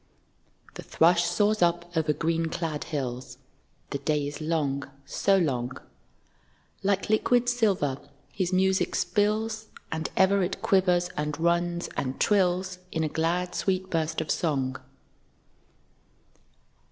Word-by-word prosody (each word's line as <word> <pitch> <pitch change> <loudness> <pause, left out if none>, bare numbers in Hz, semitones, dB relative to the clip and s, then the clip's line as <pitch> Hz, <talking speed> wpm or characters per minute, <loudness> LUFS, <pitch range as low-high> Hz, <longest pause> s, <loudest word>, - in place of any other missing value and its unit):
The - - -8
thrush 170 +1 +3
soars 210 +3 +1
up, 175 0 +1
over 160 -1 +2
green 165 +1 0
clad 160 -2 -3
hills, 125 -3 -4 0.5
(The 140 - -2
day 150 0 0
is 145 +2 -6
long, 145 -4 -1 0.2
so 195 +6 +2
long;) 130 -7 -1 1.0
Like 195 0 0
liquid 245 +3 +3
silver 200 - +1 0.3
his 185 -2 -1
music 190 +1 +2
spills, 220 +1 0 0.2
And 160 0 -2
ever 195 +1 +4
it 185 +1 -2
quivers, 180 -2 +3
and 150 0 -3
runs, 170 +1 +1
and 130 -1 -3
trills 185 -2 +1
In 160 - -1
a 155 - 0
glad 170 +3 -1
sweet 185 -1 -1
burst 160 -1 0
of 155 - -2
song. 135 -6 0
170 Hz, 125 wpm, -27 LUFS, 150-190 Hz, 1.0 s, ever